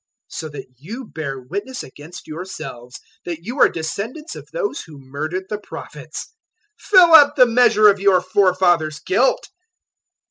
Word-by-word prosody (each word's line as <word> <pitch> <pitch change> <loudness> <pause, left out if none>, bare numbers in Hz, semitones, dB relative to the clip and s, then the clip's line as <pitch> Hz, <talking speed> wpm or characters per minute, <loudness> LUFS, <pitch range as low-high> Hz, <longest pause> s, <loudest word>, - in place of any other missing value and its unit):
023:031 - - -10
"So 155 - -5
that 145 - -9
you 225 - -8
bear 140 -8 -6
witness 200 - -6
against 145 +6 -12
yourselves 155 -7 -8 0.3
that 170 -2 -6
you 245 +8 -6
are - - +6
descendants 215 - -5
of - - -11
those 430 -10 -3
who 155 -3 -13
murdered 150 +7 -5
the 210 0 -4
Prophets. 210 - -9 0.5
023:032 - - -24
Fill 360 -4 +7
up 290 -2 +8
the 255 -4 +7
measure 230 -3 +4
of 200 -1 +4
your 195 -2 +4
forefathers' 180 -4 +1
guilt. - - 0
190 Hz, 155 wpm, -20 LUFS, 155-250 Hz, 0.5 s, up